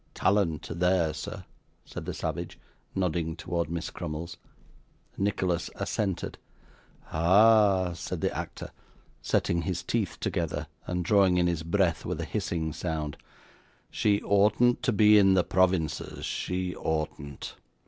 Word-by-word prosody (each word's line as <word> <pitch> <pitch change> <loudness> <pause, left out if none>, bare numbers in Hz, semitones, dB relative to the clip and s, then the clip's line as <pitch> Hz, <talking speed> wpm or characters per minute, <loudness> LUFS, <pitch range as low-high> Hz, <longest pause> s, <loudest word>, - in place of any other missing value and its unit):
'Talent 95 -6 +1
there, 90 -3 +2
sir!' 80 - -7 0.4
said - - -7
the - - -3
savage, - - -4 0.4
nodding 85 -3 -1
towards 85 -1 -2
Miss 85 0 -4
Crummles. 85 0 -5 0.8
Nicholas 95 -3 0
assented. 95 -4 -2 0.7
'Ah!' 95 +1 +5
said 85 - -5
the - - 0
actor, - - -6 0.5
setting 85 0 +1
his 90 0 -3
teeth 110 -6 -1
together, - - -2 0.2
and 90 -1 -2
drawing 95 -2 +4
in 90 - +3
his 85 -2 0
breath 85 0 +1
with - - -3
a - - -2
hissing 80 -2 -2
sound, 80 -3 -3 0.8
'she 100 -1 +2
oughtn't 105 +5 +3
to - - +1
be 105 0 +6
in 95 -1 +5
the 90 - +4
provinces, 95 -4 0
she 90 0 -2
oughtn't. 75 -3 -3
90 Hz, 130 wpm, -28 LUFS, 80-100 Hz, 0.8 s, be